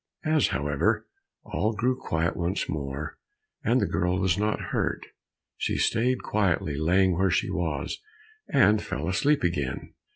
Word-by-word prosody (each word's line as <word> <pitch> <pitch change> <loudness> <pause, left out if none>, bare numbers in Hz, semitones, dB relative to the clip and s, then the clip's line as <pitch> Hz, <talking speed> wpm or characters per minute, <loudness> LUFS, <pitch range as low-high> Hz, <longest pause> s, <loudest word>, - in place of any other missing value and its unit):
As, 155 -2 +3
however, 70 +1 0 0.4
all 105 +8 -1
grew 125 +4 +1
quiet 85 -8 -1
once 90 +3 -1
more, 70 -1 -4 0.4
and - - +3
the - - +2
girl 90 +1 0
was 95 -3 +2
not 105 +2 0
hurt, - - -1 0.5
she - - -1
stayed 125 +3 +1
quietly 90 -8 0
lying 90 +4 +3
where 95 +2 +2
she 85 - +1
was, 80 -5 -2 0.5
and 110 - +5
fell 75 -2 -4
asleep 145 +11 +2
again. 70 -7 -2
90 Hz, 140 wpm, -27 LUFS, 80-105 Hz, 0.5 s, and